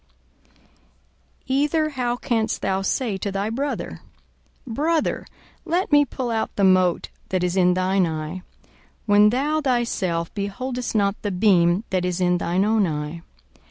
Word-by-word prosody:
42:006:042 - - -30
Either 295 +3 +1
how 250 -4 -1
canst 225 -3 -1
thou 190 0 0
say 205 +1 -1
to 200 +1 -3
thy 200 +2 -2
brother, 280 +5 -3 0.6
Brother, 300 +7 -1 0.4
let 350 +1 -1
me 290 0 +6
pull 250 -2 -4
out 225 -1 -1
the 200 - 0
mote 185 -2 +3 0.2
that 185 -1 0
is 180 0 0
in 180 -1 +3
thine 185 0 +2
eye, 160 +3 -5 0.6
when 205 -1 +5
thou 290 +6 0
thyself 230 - -1
beholdest 245 +5 -4
not 200 -1 +1
the 205 - -2
beam 180 -1 +3
that 185 -1 0
is 180 0 -1
in 180 -1 +2
thine 180 +4 +1
own 215 -2 +2
eye? 150 +1 -4
200 Hz, 150 wpm, -23 LUFS, 180-250 Hz, 0.6 s, me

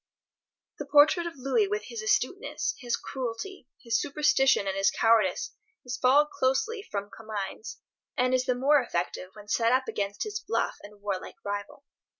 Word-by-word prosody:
The - - -5
portrait 310 +4 +5
of 335 - -7
Louis 275 - +1
with 420 +1 -2
his 465 -1 -6
astuteness, 425 -2 0
his 245 -3 -1
cruelty, 260 +6 -6 0.2
his 230 -2 +1
superstition 285 -5 +3
and 195 -1 -1
his 195 0 +3
cowardice 220 -5 +2 0.3
is 245 0 -3
followed 285 +4 +4
closely 335 - 0
from 205 - -5
Comines, 215 -1 -6 0.4
and 255 0 +2
is 255 0 +2
the 250 - +1
more 280 +3 +4
effective 180 -4 -3
when 210 -1 -13
set 230 +2 +2
up 260 0 +2
against 205 -2 -2
his 425 -1 -4
bluff 420 - -1
and 205 0 -14
war 200 -2 -1
like - - -10
rival. 205 +7 -5
250 Hz, 165 wpm, -28 LUFS, 210-295 Hz, 0.4 s, portrait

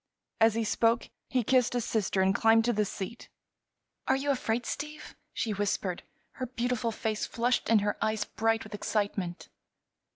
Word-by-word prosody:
As 225 -1 +5
he 230 - +1
spoke 230 +2 +2 0.2
he 255 -2 +1
kissed 250 +1 +3
his 245 -2 0
sister 200 -3 0
and 190 0 +3
climbed 225 +1 +4
to 240 - +2
the 210 -1 +1
seat. 200 +4 -6 0.8
"Are 265 - +4
you 280 +1 0
afraid, 240 -3 -1
Steve?" 300 +4 -6 0.2
she 220 - -2
whispered, 195 -2 -1 0.3
her 255 - -5
beautiful 245 -1 -1
face 215 -1 -2
flushed 240 0 0
and 225 -2 +5
her 205 0 0
eyes 215 -1 0
bright 225 0 0
with 215 - -11
excitement. 200 -4 -2
225 Hz, 165 wpm, -29 LUFS, 210-245 Hz, 0.8 s, As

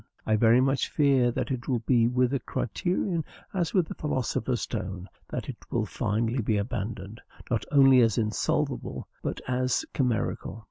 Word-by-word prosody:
I 110 - +3
very 115 +3 +5
much 135 +1 +1
fear 135 -5 +3
that 120 - -2
it 120 -2 -3
will 125 -4 0
be 120 -3 +4
with 125 +1 +2
the 140 - 0
criterion 175 - -1 0.3
as 175 -4 0
with 180 -5 +2
the - - -5
philosopher's 130 -4 -1
stone; 95 -4 -4 0.2
that - - -4
it - - -6
will - - 0
finally 115 +4 -1
be 110 -1 +1
abandoned, 105 0 -4 0.3
not 115 - 0
only 135 -3 +7
as 115 -3 +3
insolvable, 110 -2 -1
but - - -3
as 130 - 0
chimerical. 125 -4 -1
120 Hz, 160 wpm, -27 LUFS, 110-135 Hz, 0.3 s, only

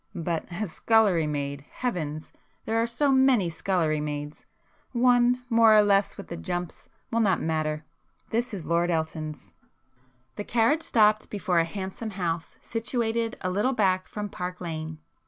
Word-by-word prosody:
But—a 175 +4 -3
scullery 195 -3 +3
maid!—heavens!—there 150 - -4
are 230 - +1
so 275 +5 +1
many 260 -9 +4
scullery 160 -3 0
maids! 150 0 -5 0.5
One 245 0 +3
more 230 -2 +6
or 210 - +7
less 200 -1 +2
with 200 - -8
the 170 - -5
'jumps' 175 -1 -5 0.2
will 230 - +1
not 195 -5 +3
matter. 155 -1 -1 0.5
This 235 +2 0
is 190 -6 -6
Lord 170 +1 +1
Elton's." 155 - -3 0.8
The 205 - -3
carriage 240 +9 +2
stopped 215 -6 +3
before 190 -4 0
a 165 - +3
handsome 190 +5 -5
house 170 -2 -3
situated 230 0 -1
a 185 - -1
little 210 +8 +1
back 185 -5 +1
from 210 -1 -5
Park 180 -2 -5
Lane. 160 -2 -5
190 Hz, 140 wpm, -26 LUFS, 160-225 Hz, 0.8 s, or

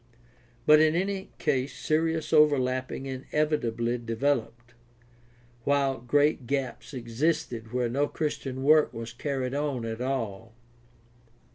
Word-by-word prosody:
But 150 0 +7
in 155 0 +4
any 190 +2 -2
case 130 -2 -1
serious 160 +1 0
overlapping 135 -4 +2
inevitably 130 -3 -1
developed, 120 0 -2 0.9
while 140 -1 +1
great 145 +2 +1
gaps 130 -4 -3
existed 120 -1 -2
where 125 -1 0
no 140 +5 0
Christian 135 -4 -3
work 155 +1 +4
was 115 0 -6
carried 130 0 -3
on 140 -4 -2
at 115 +1 -4
all. 115 -5 -3
135 Hz, 110 wpm, -28 LUFS, 120-150 Hz, 0.9 s, But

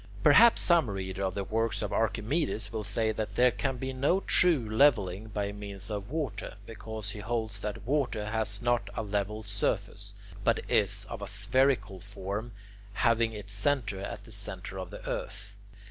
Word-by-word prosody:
Perhaps 220 +11 +7
some 170 -8 +4
reader 95 -1 -4
of 95 -1 -1
the 100 - -1
works 115 +2 -1
of 105 - -3
Archimedes 115 0 0
will 110 -1 -2
say 110 +2 0
that 110 0 -4
there 125 0 +5
can 135 +1 -2
be 130 +2 -4
no 145 +9 +2
true 165 - +3
levelling 110 -5 +3
by 100 -1 -2
means 100 0 -7
of 100 0 -4
water, 130 - -3
because 110 -2 -6
he 105 - -7
holds 110 -1 -2
that 105 -1 -5
water 125 -6 0
has 110 -1 0
not 120 -4 +1
a 110 - -2
level 105 +1 -2
surface, 105 0 -2 0.3
but - - +1
is - - +2
of - - -6
a - - -4
spherical 125 -8 +1
form, 100 +4 -5 0.4
having 115 +1 +2
its 105 -1 -7
centre 100 -2 0
at 100 - -6
the - - -14
centre - - -5
of - - -5
the - - -9
earth. 100 +1 -4
110 Hz, 175 wpm, -30 LUFS, 100-120 Hz, 0.4 s, Perhaps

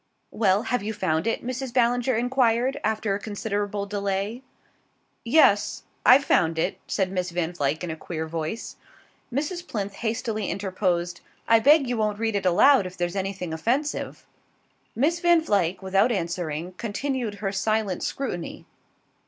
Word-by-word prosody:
"Well, 200 -1 +2
have 250 -1 -1
you 215 +2 -3
found 160 0 0
it?" 230 - -1
Mrs. 255 0 -4
Ballinger 245 0 +2
enquired 245 +2 +1
after 215 -1 0
a 200 - -2
considerable 205 -1 -3
delay. 200 +3 -2 0.8
"Yes. 230 -5 +3 0.2
I've 270 +3 +7
found 165 -1 +2
it," 170 +4 -1
said 190 -2 0
Miss 180 -1 -2
Van 175 0 -2
Vluyck 150 0 -1
in 175 - -3
a - - -4
queer 160 0 -5
voice. 160 +7 -5 0.5
Mrs. 325 +7 -3
Plinth 200 -2 -3
hastily 220 -1 -2
interposed: 180 -3 -1 0.3
"I 230 0 +6
beg 285 +3 +5
you 245 -1 -1
won't 210 -1 0
read 225 -1 -1
it 195 -2 0
aloud 205 +4 +5
if 180 - -11
there's 175 +1 -2
anything 190 -3 -3
offensive." 255 - -2 0.7
Miss 310 +8 +1
Van 345 0 +5
Vluyck, 190 - 0
without 195 +5 +3
answering, 170 -3 -3
continued 240 0 -2
her 200 -1 -3
silent 205 -1 0
scrutiny. 180 -11 -4
205 Hz, 150 wpm, -25 LUFS, 185-240 Hz, 0.8 s, I've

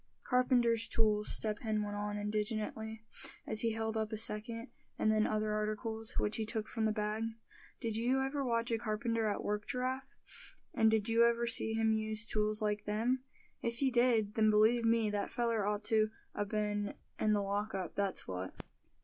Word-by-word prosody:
"Carpenter's 240 -3 +3
tools," 210 -2 +1
Step 210 -1 -1
Hen 215 -2 -1
went 205 0 -4
on, 205 0 -3
indignantly, 215 +1 -2 0.4
as 215 -1 -1
he 230 - +2
held 220 0 -2
up 220 -1 -1
a 220 - -2
second, 230 +2 -1 0.3
and 215 - +3
then 215 0 +3
other 215 0 0
articles, 215 +1 -3
which 210 - 0
he 220 - -1
took 220 0 -1
from 225 -2 -1
the 215 - +3
bag; 215 +1 -1 0.6
"did 225 -2 -2
you 245 +4 +2
ever 270 +1 -1
watch 235 -2 0
a 225 - +1
carpenter 225 0 -1
at 205 - -1
work, 210 0 -2
Giraffe; 260 +2 -2 0.6
and 220 - +4
did 220 -2 +2
you 230 0 +4
ever 235 0 +1
see 225 -1 +2
him 225 0 +3
use 220 0 0
tools 215 -1 +1
like 210 0 -1
them? 235 +5 0 0.4
If 235 +3 -1
you 265 - +3
did, 240 -4 +3
then 215 0 +4
believe 220 +3 +4
me, 225 -2 +3
that 205 -1 -1
feller 230 -4 0
ought 210 0 -1
to 215 0 +3 0.2
a 205 - -1
been 205 0 -1 0.2
in 215 -1 +3
the 205 -1 +2
lock 205 +1 -2
up, 185 -3 -3
that's 200 -1 -1
what." 95 0 -5
220 Hz, 190 wpm, -34 LUFS, 210-230 Hz, 0.6 s, and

